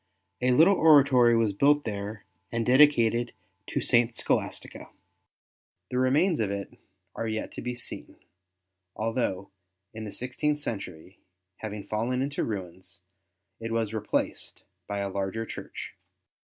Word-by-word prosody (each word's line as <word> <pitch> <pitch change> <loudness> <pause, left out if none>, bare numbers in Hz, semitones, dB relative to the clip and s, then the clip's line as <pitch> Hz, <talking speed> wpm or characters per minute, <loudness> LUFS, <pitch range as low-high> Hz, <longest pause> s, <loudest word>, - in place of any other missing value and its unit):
A 125 - +2
little 160 +10 +6
oratory 135 -6 +6
was 110 -3 +2
built 145 +7 +3
there 105 -1 -5 0.3
and 115 -1 -1
dedicated 120 -4 +4 0.3
to - - -2
St. 120 0 +3
Scholastica. - - -2 1.0
The 125 - 0
remains 150 +7 +3
of 105 -3 0
it 100 0 -5 0.4
are 115 - -3
yet 110 0 -3
to - - -7
be 125 0 -3
seen, 120 - -6 0.8
although 110 -4 -2 0.4
in 110 0 -6
the 105 - -6
sixteenth 145 +6 -1
century, 95 - -6 0.4
having 105 -2 -6
fallen 115 +6 -1
into 140 +1 -2
ruins, 90 -4 -6 0.6
it 115 0 -5
was 115 -2 -1
replaced 110 -1 -2 0.2
by 100 -1 -2
a 100 - -1
larger 100 +3 -3
church. - - -8
115 Hz, 130 wpm, -27 LUFS, 100-130 Hz, 1.0 s, little